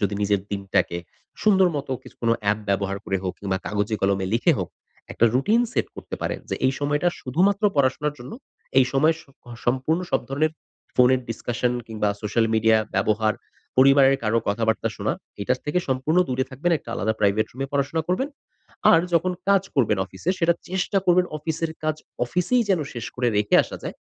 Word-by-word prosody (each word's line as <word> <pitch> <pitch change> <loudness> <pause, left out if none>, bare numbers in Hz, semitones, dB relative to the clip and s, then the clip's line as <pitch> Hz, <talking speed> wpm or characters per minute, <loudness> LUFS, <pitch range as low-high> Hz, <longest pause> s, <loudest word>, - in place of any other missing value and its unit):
যদি 100 0 0
নিজের 100 -1 +2
দিনটাকে 100 -3 0 0.4
সুন্দর 190 -3 +5
মত, 140 - -4
কিছু - - -15
কোনো 115 0 +3
অ্যাপ 105 +1 +1
ব্যবহার 100 0 0
করে 95 - 0
হোক 90 - -1
কিংবা 95 -2 -2
কাগজে 105 +1 -1
কলমে 95 -1 +1
লিখে 120 - +3
হোক, - - -3 0.4
একটা 115 - +2
রুটিন 210 - +3
সেট - - 0
করতে - - -7
পারেন। - - -2
যে, - - 0
এই 130 - +2
সময় 145 +1 0 0.2
শুধুমাত্র 190 - +1
পড়াশোনার 140 +2 +1
জন্য 120 +2 -9 0.5
এই 130 - +6
সময়ে 155 +4 +3
স - - -22 0.4
সম্পূর্ণ 130 +7 +1
সব - - +2
ধরণের 155 +4 0 0.4
ফোনের 125 +1 +5
ডিসকাশন 120 +1 -1
কিংবা 110 -2 -1
সোশ্যাল 115 +2 +1
মিডিয়া 110 0 +4 0.2
ব্যবহার 110 0 +1 0.4
পরিবারের 135 +1 +6
কারো 110 +1 +2
কথাবার্তা 110 +2 0
শোনা, - - -1 0.3
এটার 125 +5 0
থেকে 150 +4 0
সম্পূর্ণ 135 +6 +1
দূরে 130 0 0
থাকবেন। 150 +7 -1
একটা - - -18
আলাদা 110 -1 0
প্রাইভেট 105 +1 +2
রুমে 135 +2 -4
পড়াশোনা 145 +3 0
করবেন। 260 +10 0 0.6
আর 165 - +6
যখন 180 +2 +2 0.2
কাজ 195 -2 +5
করবেন 110 -7 +2
অফিসে 95 - -3
সেটা 170 -1 +3
চেষ্টা 190 +2 0
করবেন, 180 0 +4
অফিসের 160 +1 -2
কাজ 155 0 0 0.3
অফিসেই 180 - +1
যেন 185 - +3
শেষ 120 - -5
করে 125 -1 +1
রেখে 105 0 +2
আসা - - -8
যায়। - - -5
130 Hz, 175 wpm, -24 LUFS, 110-160 Hz, 0.6 s, এই